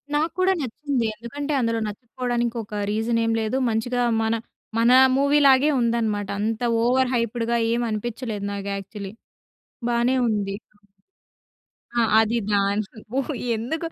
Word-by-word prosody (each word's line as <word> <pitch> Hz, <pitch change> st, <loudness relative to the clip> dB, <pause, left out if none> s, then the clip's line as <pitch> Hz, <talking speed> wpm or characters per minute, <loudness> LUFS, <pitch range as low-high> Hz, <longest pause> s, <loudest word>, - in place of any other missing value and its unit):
నాకు 315 Hz, +2 st, +1 dB
కూడా 375 Hz, +1 st, +4 dB
నచ్చింది. 265 Hz, -1 st, -2 dB
ఎందుకంటే 285 Hz, +7 st, -5 dB
అందులో 230 Hz, -1 st, 0 dB
నచ్చకపోవడానికి 240 Hz, +2 st, -3 dB
ఒక 210 Hz, 0 st, -5 dB
రీజన్ 225 Hz, +2 st, 0 dB
ఏమి 225 Hz, 0 st, +1 dB
లేదు. 220 Hz, +4 st, -1 dB
మంచిగా 245 Hz, +3 st, 0 dB, 0.2 s
మన, 220 Hz, 0 st, +1 dB, 0.5 s
మన 235 Hz, +2 st, +4 dB, 0.3 s
మూవీ 280 Hz, +1 st, +3 dB
లాగే 270 Hz, +3 st, +5 dB
ఉందన్నమాట. 225 Hz, -4 st, 0 dB
అంత 220 Hz, +2 st, -1 dB, 0.2 s
ఓవర్ 255 Hz, +1 st, +2 dB
హైప్డ్‌గా 235 Hz, 0 st, 0 dB
ఏమి 240 Hz, 0 st, 0 dB
అనిపించలేదు 215 Hz, -1 st, -4 dB
నాకు 200 Hz, 0 st, -5 dB
యాక్చువల్లీ. 195 Hz, 0 st, -7 dB, 0.8 s
బానే 240 Hz, +2 st, +2 dB
ఉంది. 200 Hz, -2 st, -1 dB, 1.4 s
ఆ! -, -, +5 dB, 0.2 s
అది 225 Hz, +2 st, +2 dB
దాని 200 Hz, +1 st, 0 dB, 0.2 s
ఓహ్! 275 Hz, +3 st, -1 dB, 0.2 s
ఎందుకు 315 Hz, +9 st, -3 dB
235 Hz, 130 wpm, -23 LUFS, 215-255 Hz, 1.4 s, లాగే